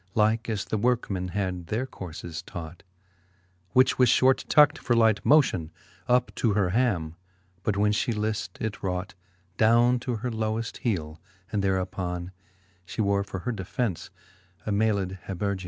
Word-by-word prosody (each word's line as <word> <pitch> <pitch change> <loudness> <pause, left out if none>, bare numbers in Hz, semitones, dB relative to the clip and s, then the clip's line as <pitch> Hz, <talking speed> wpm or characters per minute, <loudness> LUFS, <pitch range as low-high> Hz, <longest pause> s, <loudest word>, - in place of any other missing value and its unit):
Like 110 +2 +2
as 105 -4 -2
the 110 - -2
workeman 105 -6 0
had 90 -3 -3
their 110 +8 -1
courfcs 85 -6 -7
taught 85 -1 -8 0.9
5 - - -39
Which 130 +1 +4
was 125 -2 +6
fliort 130 +2 +4
tucked 150 -1 +5
for 120 - +1
light 110 -3 +3
motion 130 - +3 0.4
Up 125 0 +2
to 110 -4 +2
her 95 -3 +1
ham, 95 -9 0 0.4
but 105 0 -1
when 105 +1 +3
/he 105 +3 0
lift, 105 -4 -3
it 110 -1 -4
raught 90 +1 -3 0.4
Downe 120 +3 +4
to 125 0 -3
her 120 +3 -3
loweft 110 +1 -2
heele, 80 - -2 0.3
and 105 - 0
thereuppon 90 -2 -2 0.5
She 90 - -10
wore 100 -1 +2
for 95 -2 -6
her 125 - -2
defence 105 -1 -3 0.6
a 105 - -2
mayled 100 -3 0
habergeon. 100 +1 -2
105 Hz, 155 wpm, -27 LUFS, 90-115 Hz, 0.9 s, was